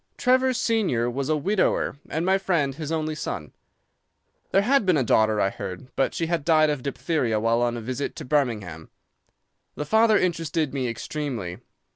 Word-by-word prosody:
"Trevor 260 0 +3
senior 195 - 0
was 135 +3 -3
a 155 - +2
widower, 185 -2 0
and 160 +2 -2
my 190 +1 +3
friend 165 -8 0
his 155 +2 -6
only 155 -1 -1
son. 85 - -5 1.0
"There 195 - +3
had 275 +3 +3
been 185 -4 +3
a 135 - +2
daughter, 110 -2 +3
I 95 - +2
heard, 90 +7 -7
but 135 - 0
she 165 - -1
had 165 -2 -1
died 155 -1 +4
of 145 -3 -3
diphtheria 135 -4 -1
while 115 +2 +1
on 120 0 0
a - - -5
visit 130 +4 -4
to 155 - -7
Birmingham. 110 - -1 0.9
The 150 - -4
father 220 +5 +4
interested 165 -5 -1
me 130 -3 -1
extremely. 115 -6 -4
150 Hz, 175 wpm, -25 LUFS, 120-170 Hz, 1.0 s, died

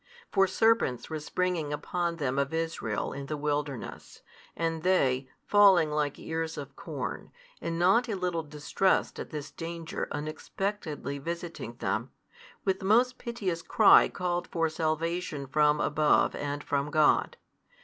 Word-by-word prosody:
For 195 -1 +4
serpents 205 - +2
were 155 - -2
springing 170 -1 -1
upon 170 +3 -2
them 140 -4 -1
of 140 +3 -1
Israel 160 -10 -2
in 140 0 -6
the 150 - -3
wilderness, 145 -3 -4 0.3
and 165 -1 -1
they, 135 -8 +2 0.2
falling 195 -7 +6
like 150 -1 -1
ears 160 0 -4
of 140 -1 -7
corn, 140 -6 -5 0.3
and 165 0 -2
not 195 +8 +4
a 215 - -1
little 180 -3 -1
distressed 155 +5 0
at - - -6
this 150 -2 -6
danger 165 -1 -5
unexpectedly 155 0 -4
visiting 170 -4 -5
them, - - -2 0.6
with 190 -1 +1
most 240 +6 +3
piteous 200 -8 -3
cry 215 +4 +6
called 175 -1 -2
for 165 -1 0
salvation 160 -1 -2
from 150 +2 +3
above 150 0 +3
and 145 0 -4
from 140 0 -1
God. 150 0 +3
160 Hz, 140 wpm, -29 LUFS, 145-180 Hz, 0.6 s, falling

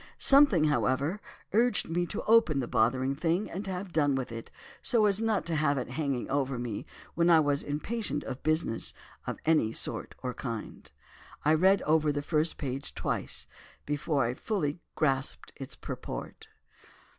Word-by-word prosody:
Something, 275 - +6
however, 145 - +1 0.3
urged 235 +1 +2
me 175 +2 -1
to 210 - -4
open 220 -10 +4
the 125 - -2
bothering 130 +4 +1
thing, 165 +7 -1
and 195 +3 -5
have 185 -1 -5
done 145 -3 +2
with 130 -3 -3
it, 115 0 -7 0.3
so 230 -4 +3
as 205 +1 +2
not 220 -3 +1
to 170 -1 0
have 145 -2 +2
it 125 -1 -4
hanging 140 -3 -2
over 135 -2 -1
me 120 -4 -5 0.3
when 170 +1 +2
I 165 -2 +7
was 145 -2 +2
impatient 150 +2 -3
of 130 -1 -6
business 155 -7 0 0.3
of - - -3
any 155 -9 +3
sort - - -4
or 125 -1 -2
kind. 115 -5 -6 0.5
"I 155 - +5
read 190 +5 +4
over 155 -1 +3
the 145 0 -3
first 155 +1 +1
page 135 -1 -5
twice - - -1 0.4
before 145 -2 0
I 120 - -1
fully 155 - -2 0.2
grasped 135 -3 0
its 135 -2 -8
purport. - - -7
150 Hz, 165 wpm, -29 LUFS, 135-175 Hz, 0.5 s, I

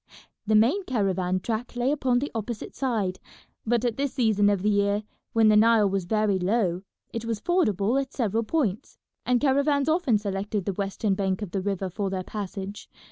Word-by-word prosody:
The 215 - +3
main 250 - +4
caravan 190 -5 0
track 235 +3 -3
lay 245 +3 +1
upon 265 -4 +1
the 280 +4 -2
opposite 225 0 -5
side, 215 -9 -1 0.5
but 240 +1 +1
at 235 -2 -1
this 280 -1 -1
season 215 -5 +3
of 200 -2 0
the 210 - +3
year, 200 +1 +1 0.3
when 225 -1 +5
the 215 - +5
Nile 220 -1 +5
was 195 -2 -1
very 210 0 +1
low, 185 -2 0 0.3
it 230 - -3
was 230 -2 -2
fordable 235 - +1
at 270 0 -7
several 225 -3 0
points, 225 - -2 0.3
and 250 -1 +3
caravans 280 +1 +2
often 310 -8 +2
selected 200 -1 -3
the 200 - -1
western 200 +1 -1
bank 190 0 -1
of 190 - -6
the 195 - -1
river 195 -1 -2
for 195 +2 -3
their 190 -1 -3
passage. 200 0 -6
215 Hz, 190 wpm, -26 LUFS, 195-245 Hz, 0.5 s, when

